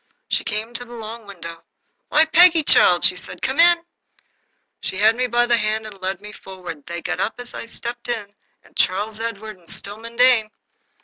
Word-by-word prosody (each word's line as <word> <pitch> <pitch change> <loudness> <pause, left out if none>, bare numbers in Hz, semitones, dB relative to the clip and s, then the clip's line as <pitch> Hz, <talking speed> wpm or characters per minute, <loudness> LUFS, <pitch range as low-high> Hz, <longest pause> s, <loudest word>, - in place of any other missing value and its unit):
She - - 0
came 220 +3 -3
to 245 - -3
the 240 0 -11
long 225 -1 -8
window. 170 -4 -9 0.5
"Why, 310 +1 +5
Peggy, 330 0 +6
child," 175 -10 +5
said 180 -1 +3 0.2
she, - - -1
"come 265 +4 -3
in." 340 0 +6 1.0
She 185 - -4
had 215 +3 +4
me 250 +1 0
by 240 0 +2
the 240 -1 +3
hand 215 0 -1
and 200 -3 -11
led 190 0 -3
me 210 0 -9
forward. 185 -7 -10
They 170 0 -6
got - - -3
up 225 +4 -2
as 245 0 -9
I - - -7
stepped 235 +1 -7
in, 210 -4 -4 0.4
Charles 210 +4 0
Edward 220 -3 -6
and 170 - -16
Stillman 210 +4 -7
Dane. 245 -3 +4
220 Hz, 190 wpm, -21 LUFS, 195-240 Hz, 1.0 s, Peggy